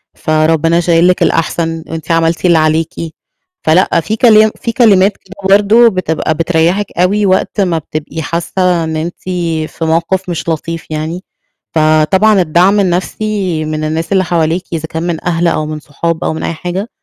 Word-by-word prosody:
فربنا 160 +1 +1
شايل 170 0 +3
لِك 180 - +2
الأحسن، 165 0 -1
وأنتِ 160 0 -5
عملتِ 165 +1 +1
اللي 170 -2 +4
عليكِ." 155 +1 +1 0.7
فلأ، 170 +1 +3
في 215 - -3
كلام 220 -2 +5
في 230 - -2
كلمات 205 -4 +3
كده 195 - -16 0.2
برضو 220 +4 +4
بتبقى 165 -5 -1
بتريحِك 170 +4 0
أوي 200 +4 +2
وقت 190 +2 +1
ما 175 -4 +1
بتبقي 155 +1 -5
حاسة 170 +2 -1
إن 160 0 -3
أنتِ 165 +3 -3 0.5
في 165 - -5
موقف 170 +4 0
مش 170 -1 -3
لطيف 165 +1 -4
يعني، 160 +4 -4 0.5
فطبعًا 160 +7 +3
الدعم 180 +5 +3
النفسي 185 -2 -1
من 155 0 -3
الناس 160 +3 -3
اللي 190 -1 +3
حواليكِ، 170 0 0
إذا 160 -1 -3
كان 160 +1 -4
من 170 -2 -3
أهل 175 0 +1
أو 155 -2 0
من 155 0 -5
صحاب 160 +3 -3
أو - - -1
من 160 - -5
أي - - -2
حاجة، 180 +6 -5
170 Hz, 165 wpm, -13 LUFS, 160-185 Hz, 0.7 s, كلام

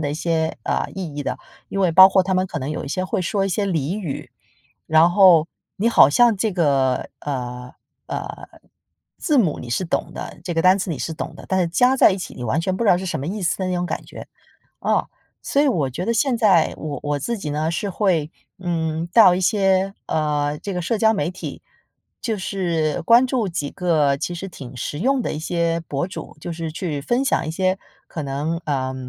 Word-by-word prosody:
的 145 -2 -2
一 - - -3
些， 160 0 -1
呃， - - -1
意 180 -6 -5
义 145 - -4
的。 - - -2 0.3
因 195 - -3
为 185 - +3
包 185 +3 +9
括 190 -1 +3
他 190 0 -1
们 185 +1 +1
可 160 -5 -5
能 135 +3 -3
有 155 - -4
一 - - -7
些 185 +6 -2
会 185 - -2
说 195 +2 0
一 - - -1
些 200 +2 -1
俚 170 +1 -1
语， 165 -9 -5 0.6
然 160 +2 +5
后 175 -4 +6 0.3
你 220 +4 +1
好 145 - +6
像 235 +6 +4
这 215 +2 -1
个， 140 -7 +1
呃 125 -3 -5 0.4
呃， - - -6 0.7
字 300 -5 +1
母 180 -11 +2
你 120 - -8
是 135 +10 -1
懂 - - -2
的 - - -7
这 180 - -4
个 165 - +1
单 185 +2 +5
词 185 - -3
你 160 - -2
是 165 - -4
懂 - - -6
的， - - -11
但 190 0 +1
是 175 - +1
加 250 +10 +3
在 250 - +6
一 190 - -2
起 185 - -7
你 125 - -8
完 120 +7 0
全 185 +2 -1
不 235 - -2
知 210 - +4
道 175 - +5
是 190 - -5
什 175 - -2
么 140 - -4
意 195 +1 -4
思 170 - 0
的 185 - -1
那 180 - -1
种 175 0 -1
感 - - -4
觉， - - -11 0.5
哦。 - - 0 0.4
所 280 - +2
以 290 - +4
我 150 - 0
觉 175 +9 -4
得 230 - +1
现 245 +1 +1
在 195 -8 +4
我 145 -4 -5
我 145 0 -1
自 235 - -3
己 155 -7 -5
呢， 155 +2 -1
是 200 +4 -2
会， 175 -6 0 0.3
嗯， 165 -2 -2
到 210 -6 +7
一 185 - -2
些， 195 -1 +2
呃， 150 -1 0
这 200 - -5
个 180 - -2
社 220 +7 -1
交 220 +1 +4
媒 195 -4 -1
体， 185 - -7 0.6
就 225 -3 -2
是 170 -6 -1
关 235 +7 +5
注 245 -4 0
几 165 -5 -3
个 155 -7 +1
其 175 +5 -4
实 195 +3 -6
挺 130 -7 -10
实 145 +4 -5
用 265 +5 +2
的 - - -3
一 - - -4
些 170 +1 -1
博 140 +4 -2
主， - - -8
就 175 - -6
是 165 -1 -5
去 160 -4 -3
分 240 - +1
享 265 - 0
一 - - -2
些 185 +3 0 0.3
可 155 - -5
能， 145 +4 -2
呃， 130 -3 -2
175 Hz, 250 characters per minute, -21 LUFS, 150-195 Hz, 0.7 s, 包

